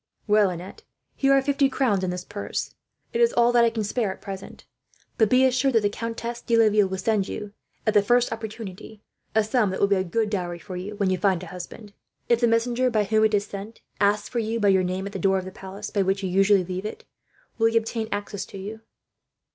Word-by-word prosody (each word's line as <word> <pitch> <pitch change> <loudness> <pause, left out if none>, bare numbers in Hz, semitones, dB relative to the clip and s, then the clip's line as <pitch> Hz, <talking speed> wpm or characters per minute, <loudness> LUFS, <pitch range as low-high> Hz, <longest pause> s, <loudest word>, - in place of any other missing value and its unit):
"Well, 210 -2 +4
Annette, 180 - -8 0.3
here 275 0 +2
are 270 -1 +4
fifty 275 0 +2
crowns 225 -8 +1
in 185 - 0
this 180 0 -4
purse. 205 0 -4 0.4
It 470 - +1
is 470 0 +5
all 240 0 +4
that 240 -1 +5
I 235 - +5
can 225 -1 -3
spare, 210 0 -1
at - - -9
present; 195 -1 -9 0.5
but 220 -2 +4
be 255 +1 +5
assured 260 0 +2
the 210 -2 +3
Countess 230 +2 -5
de 230 - +1
Laville 215 -3 +4
will 190 0 -4
send 205 -1 0
you, 210 -1 -6 0.3
at 215 - +2
the 205 - +6
first 240 +3 +2
opportunity, 220 -2 -8 0.3
a 220 - +4
sum 215 -1 +1
that 190 - -3
will - - +5
be 200 0 +2
a 185 - +1
good 210 +4 -1
dot 175 -4 -3
for 185 0 -8
you, 190 +4 -5
when 200 -2 +1
you 185 - 0
find 185 -2 +1
a 175 - -9
husband. 200 +3 -9 0.4
If 235 -1 +4
the 240 - +5
messenger 240 +2 +2
by 215 -3 +2
whom 215 +2 +3
it 215 -1 +3
is 200 0 0
sent 205 +2 -8 0.2
asks 205 +1 +2
for 240 - -2
you 225 +1 -1
by 205 -2 +3
your 190 -1 +4
name, 185 +1 -2
at 200 - -5
the 195 - -4
door 195 +2 +2
of 185 - -4
the 185 - -7
palace 190 +1 -8
by 200 - +1
which 195 +1 0
you 190 - -1
usually 195 0 +4
leave 185 +1 -5
it, 440 - -6 0.5
will 225 - +5
he 225 0 +2
obtain 225 0 -1
access 205 -1 -3
to - - -10
you?" 210 +3 -7
210 Hz, 240 wpm, -25 LUFS, 195-230 Hz, 0.5 s, the